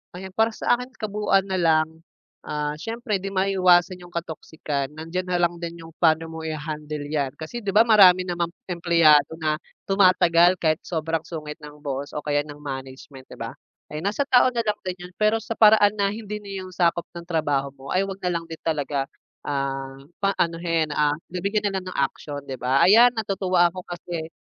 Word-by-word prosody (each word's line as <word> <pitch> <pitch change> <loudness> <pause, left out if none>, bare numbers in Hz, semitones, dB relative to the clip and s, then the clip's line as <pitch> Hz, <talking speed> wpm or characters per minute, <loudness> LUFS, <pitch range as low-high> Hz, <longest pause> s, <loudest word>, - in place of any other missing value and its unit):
Ayan, 190 +1 -8
para 220 +4 +2
sa 240 - +1
akin 250 +1 -9
kabuuan 210 -2 +1
na 190 -1 -2
lang. 160 -1 +2 0.5
Ah, 150 0 -2
siyempre 225 0 -3
'di 195 - -6
maiwasan 185 -2 +3
yung 175 0 -14
katoxican. 160 -4 -4
Nandiyan 165 +4 -4
na 180 - -1
lang 175 0 +1
din 170 0 -6
yung 165 - -12
pa'no 165 -1 +3
mo 160 - -7
iha-handle 150 -1 -5
'yan 140 -4 -1
kasi 160 +10 -6
'di 205 -4 -3
ba, 220 - +8
marami 195 -5 +7
namang 175 -2 -2 0.2
empleyado 165 -4 +4
na 155 -2 -1 0.3
tumatagal 185 -2 +4
kahit 160 -3 +1
sobrang 160 -1 -2
sungit 150 -3 -6
ng 150 -1 -12
boss 140 0 -4
o 150 - -2
kaya 145 -1 0
ng 145 - -9
management, 135 -1 -8
'di - - -11
ba? - - -6 0.4
Kaya 150 - -4
nasa 210 +8 +1
tao 250 -1 +6
na 235 - +2
lang 210 -1 -1
din 180 - -2
yun, 180 0 -11
pero 215 +1 +3
sa 225 - -11
paraan 210 -1 +6
na 200 - +3
hindi 210 -1 -6
na 205 -1 -12
yung 185 - -10
sakop 170 -1 +1
ng 170 -1 -9
trabaho 145 -5 -1
mo 135 0 -15
ay 190 +2 +2
wag 195 -1 -6
na 180 - +1
lang 165 - -12
din 165 -1 -9
talaga. 145 -3 -1 0.4
Ah, 135 -1 -3 0.2
pa 195 - +3
anuhin, 165 -1 0
ah, 150 0 +2 0.2
nabigyan 200 +4 -1
na 195 - -3
lang - - -14
ng - - -8 0.2
aksiyon, 145 -1 -8
'di 135 - -4
ba? 130 +2 +2
Ayan, 235 +5 +7
natutuwa 190 -4 +2
ako 180 +1 -7
kasi 170 -2 -6
170 Hz, 195 wpm, -24 LUFS, 150-190 Hz, 0.5 s, ba